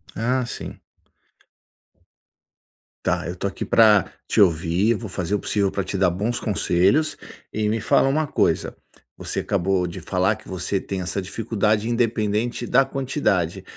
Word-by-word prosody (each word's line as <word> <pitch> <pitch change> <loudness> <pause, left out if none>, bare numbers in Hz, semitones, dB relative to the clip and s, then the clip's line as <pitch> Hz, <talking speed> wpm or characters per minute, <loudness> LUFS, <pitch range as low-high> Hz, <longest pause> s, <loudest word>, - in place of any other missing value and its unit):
Ah, 125 +3 0
sim. - - -7 2.2
Tá, 90 -1 0
eu 90 - -5
tô 95 - -2
aqui 100 - -5
pra 105 -4 +4 0.2
te - - +3
ouvir, 90 +4 +3
vou 110 0 -5
fazer 95 +1 -3
o 105 - +2
possível 100 -1 0
pra 100 - -2
te 100 - -3
dar 95 -1 +3
bons 105 +7 -2
conselhos, 100 - +1 0.4
e 105 0 0
me 110 +1 0
fala 135 - +3
uma 155 +2 +1
coisa, - - 0 0.4
você - - -4
acabou 95 -1 0
de 90 +2 -7
falar 95 +4 +1
que 110 - -15
você 95 +1 -2
tem 95 - -4
essa 90 +2 -3
dificuldade 110 +2 -1
independente 115 0 0
da 135 +2 +5
quantidade, 130 - -1
105 Hz, 155 wpm, -23 LUFS, 95-115 Hz, 2.2 s, da